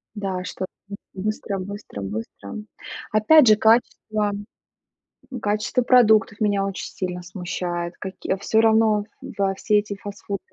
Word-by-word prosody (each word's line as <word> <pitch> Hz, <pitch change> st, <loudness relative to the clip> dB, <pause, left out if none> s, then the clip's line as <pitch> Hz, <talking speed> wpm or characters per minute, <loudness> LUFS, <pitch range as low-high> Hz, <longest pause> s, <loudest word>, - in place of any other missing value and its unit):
Да. 190 Hz, -3 st, -3 dB
Чтобы 185 Hz, 0 st, -5 dB, 0.5 s
быстро 200 Hz, 0 st, -3 dB
быстро 200 Hz, -, -7 dB
быстро. 100 Hz, 0 st, -6 dB, 0.6 s
Опять 245 Hz, +7 st, +6 dB
же, 215 Hz, -, +8 dB
качество 215 Hz, -1 st, +2 dB, 1.1 s
качество 215 Hz, +4 st, 0 dB
продуктов 220 Hz, -4 st, +4 dB
меня 205 Hz, -2 st, +1 dB
очень 195 Hz, -1 st, -4 dB
сильно 180 Hz, -1 st, -5 dB
смущает, 175 Hz, -1 st, -4 dB
каки 190 Hz, 0 st, -3 dB
всё 220 Hz, +3 st, +2 dB
равно 220 Hz, -2 st, +4 dB, 0.3 s
во 195 Hz, -1 st, +1 dB
все 210 Hz, +1 st, +2 dB
эти 205 Hz, -1 st, -5 dB
фастфуды. 200 Hz, 0 st, -6 dB
205 Hz, 120 wpm, -23 LUFS, 185-215 Hz, 1.1 s, же